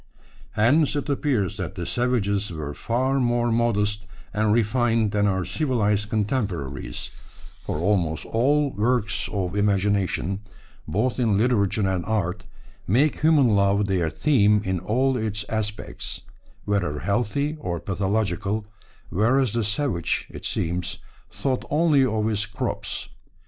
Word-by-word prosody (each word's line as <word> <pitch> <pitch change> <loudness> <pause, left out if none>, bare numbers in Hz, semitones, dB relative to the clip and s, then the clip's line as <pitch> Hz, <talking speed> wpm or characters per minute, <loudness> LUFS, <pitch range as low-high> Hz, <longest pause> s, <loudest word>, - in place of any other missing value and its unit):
Hence 140 +8 +3
it 145 0 -2
appears 125 - 0
that 95 -1 -4
the 90 -3 -4
savages 105 -5 0
were 75 -3 -5
far 130 - 0
more 120 -1 +1
modest 105 -2 +1 0.3
and 110 0 +2
refined 115 -1 +2
than 105 -1 +2
our 95 -2 0
civilised 105 - 0
contemporaries, 100 - -2 0.5
for - - -3
almost 85 -3 0
all 140 +5 +2
our 100 - -5
works 115 -2 +1
of 95 -2 -2
imagination, 100 -2 +1 0.5
both 120 +7 0
in 110 -5 +2
literature 105 -3 +2
and 95 -2 -1
art, 100 -3 -1 0.4
make 135 +9 +2
human 150 -5 +5
love 100 0 +3
their 90 -4 0
theme 105 - +3
in 95 -1 0
all 130 +9 +1
its 105 -2 -2
aspects, 105 -1 -3 0.4
whether 95 -8 0
healthy 120 - 0
or 85 - -3
pathological; 100 +2 -1 0.5
whereas 120 +4 +2
the 115 -1 0
savage, 105 - -1
it - - -8
seems, 85 +2 -2 0.3
thought 130 -2 -2
only 150 -3 +4
of 110 -4 0
his 110 0 0
crops. 105 0 -3
105 Hz, 130 wpm, -24 LUFS, 100-120 Hz, 0.5 s, human